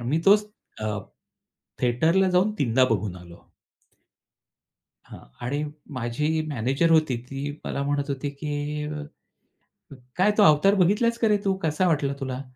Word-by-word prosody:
आणि 120 Hz, -, -5 dB
मी 155 Hz, -, +2 dB
तोच 210 Hz, +1 st, +6 dB, 0.3 s
अ, 105 Hz, -1 st, -2 dB, 0.8 s
थिएटरला 160 Hz, +11 st, +2 dB
जाऊन 185 Hz, +4 st, +2 dB
3दा 130 Hz, 0 st, +3 dB
बघून 100 Hz, -4 st, -1 dB
आलो. 85 Hz, -1 st, -14 dB, 1.6 s
हां, -, -, -12 dB, 0.3 s
आणि 145 Hz, +3 st, -1 dB, 0.4 s
माझी 150 Hz, +7 st, -1 dB
मॅनेजर 135 Hz, +5 st, 0 dB
होती 155 Hz, -6 st, +3 dB
ती 140 Hz, +1 st, -4 dB
मला 140 Hz, -, -3 dB
म्हणत 145 Hz, 0 st, -1 dB
होती 140 Hz, +1 st, -3 dB
की 150 Hz, 0 st, -3 dB
अ, 150 Hz, 0 st, -5 dB, 0.9 s
"क -, -, -11 dB, 0.2 s
काय 195 Hz, +3 st, +4 dB
तो 210 Hz, -, +6 dB
अवतार 155 Hz, +6 st, +5 dB
बघितलास 210 Hz, +5 st, +2 dB
का 225 Hz, -, +3 dB
रे 210 Hz, -1 st, +3 dB
तू? 195 Hz, -, +2 dB
कसा 160 Hz, +4 st, +1 dB
वाटला 145 Hz, -4 st, +1 dB
तुला?" 130 Hz, -1 st, -4 dB
150 Hz, 150 wpm, -25 LUFS, 130-180 Hz, 1.6 s, तोच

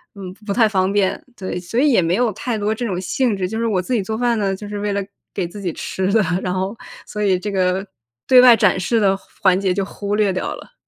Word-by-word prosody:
嗯， 185 Hz, -2 st, -8 dB
不 200 Hz, -, -3 dB
太 225 Hz, 0 st, +4 dB
方 190 Hz, -2 st, +1 dB
便， 200 Hz, -2 st, +1 dB, 0.2 s
对， 185 Hz, -2 st, -4 dB
所 180 Hz, +7 st, -3 dB
以 290 Hz, 0 st, +4 dB
也 225 Hz, -, +4 dB
没 170 Hz, +1 st, +1 dB
有 240 Hz, 0 st, +1 dB
太 245 Hz, -1 st, -3 dB
多 210 Hz, +1 st, 0 dB
这 240 Hz, -, -5 dB
种 185 Hz, -4 st, -2 dB
兴 205 Hz, +4 st, 0 dB
致。 185 Hz, -1 st, -1 dB
就 220 Hz, +3 st, -4 dB
是 230 Hz, -, 0 dB
我 195 Hz, -4 st, +1 dB
自 250 Hz, -, -4 dB
己 225 Hz, -, +2 dB
做 220 Hz, +3 st, -4 dB
饭 240 Hz, -1 st, +1 dB
呢， 195 Hz, -2 st, 0 dB
就 205 Hz, +2 st, -9 dB
是 205 Hz, 0 st, -5 dB
为 205 Hz, 0 st, -1 dB
了 200 Hz, -, -1 dB, 0.3 s
给 180 Hz, -3 st, -1 dB
自 200 Hz, +4 st, -10 dB
己 180 Hz, -3 st, -2 dB
吃 190 Hz, +1 st, -2 dB
的， 220 Hz, -, +4 dB, 0.2 s
然 180 Hz, -, -2 dB
后 190 Hz, +3 st, -2 dB, 0.3 s
所 210 Hz, -, -6 dB
以 190 Hz, -3 st, +3 dB
这 205 Hz, +3 st, -4 dB
个 190 Hz, 0 st, 0 dB, 0.4 s
对 255 Hz, -1 st, +8 dB
外 245 Hz, -2 st, +8 dB
展 190 Hz, -, +3 dB
示 225 Hz, +5 st, +1 dB
的 195 Hz, -2 st, +3 dB, 0.3 s
环 190 Hz, -1 st, +4 dB
节 190 Hz, -2 st, +1 dB
就 195 Hz, +1 st, -1 dB
忽 205 Hz, +1 st, -4 dB
略 210 Hz, -3 st, +2 dB
掉 185 Hz, -, -3 dB
了。 -, -, -14 dB
200 Hz, 285 characters per minute, -20 LUFS, 185-220 Hz, 0.4 s, 对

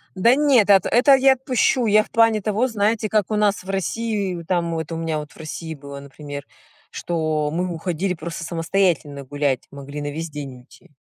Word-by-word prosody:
Да 230 Hz, +7 st, +4 dB
нет, 270 Hz, -8 st, +4 dB
ат 195 Hz, -3 st, +6 dB
это 270 Hz, +3 st, +5 dB
я 270 Hz, 0 st, +5 dB
отпущу. 255 Hz, -1 st, +1 dB
Я 215 Hz, 0 st, +4 dB
в -, -, -20 dB
плане 225 Hz, -2 st, +3 dB
того, 215 Hz, +5 st, 0 dB
знаете, 220 Hz, -1 st, 0 dB
как 215 Hz, -1 st, 0 dB
у 215 Hz, -, +1 dB
нас 205 Hz, -2 st, +1 dB
в 190 Hz, -, -12 dB
России, 200 Hz, +1 st, -2 dB
ну, 170 Hz, -, -7 dB
там 170 Hz, -1 st, -1 dB
вот, 160 Hz, 0 st, -4 dB
у 165 Hz, -, -3 dB
меня 160 Hz, -2 st, -2 dB
вот 150 Hz, 0 st, -9 dB
в -, -, -19 dB
России 160 Hz, +1 st, -6 dB
было, 140 Hz, -1 st, -9 dB
например, 140 Hz, 0 st, -9 dB, 0.4 s
что 155 Hz, -3 st, -1 dB
мы 180 Hz, +2 st, -1 dB
уходили 180 Hz, +2 st, -2 dB
просто 165 Hz, 0 st, -6 dB
самостоятельно 165 Hz, -4 st, 0 dB
гулять, 140 Hz, -1 st, -1 dB
могли 140 Hz, +1 st, -8 dB
на 145 Hz, 0 st, -4 dB
весь 165 Hz, +2 st, -5 dB
день 140 Hz, -3 st, -7 dB
уйти. 145 Hz, +7 st, -20 dB
175 Hz, 200 wpm, -22 LUFS, 150-215 Hz, 0.4 s, ат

